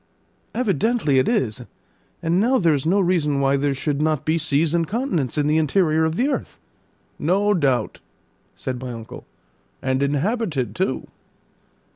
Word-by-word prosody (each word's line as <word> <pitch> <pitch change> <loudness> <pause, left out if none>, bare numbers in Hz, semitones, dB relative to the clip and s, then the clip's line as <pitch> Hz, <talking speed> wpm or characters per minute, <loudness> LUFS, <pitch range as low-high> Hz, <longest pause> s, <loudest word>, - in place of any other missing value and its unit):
"Evidently 215 - +1
it 130 - +1
is; 195 - 0 0.6
and 170 +2 +2
now 250 +6 +3
there 170 -8 +3
is 145 +1 -1
no 195 +4 +3
reason 170 -6 +1
why 135 0 +2
there 140 +1 +1
should 145 +1 -2
not 155 -2 0
be 155 - +2
seas 155 +1 +1
and 170 -1 +1
continents 190 - -1
in 150 - +2
the 155 +2 +3
interior 160 0 +2
of 160 0 -1
the 250 +8 +1
earth." 285 - -3 0.6
"No 200 +6 +2
doubt," 140 -9 0 0.6
said 130 -1 -4
my 130 -1 -5
uncle; 115 -1 -9 0.5
"and 130 0 -1
inhabited 145 - -1
too." 185 -8 -1
155 Hz, 155 wpm, -22 LUFS, 140-190 Hz, 0.6 s, now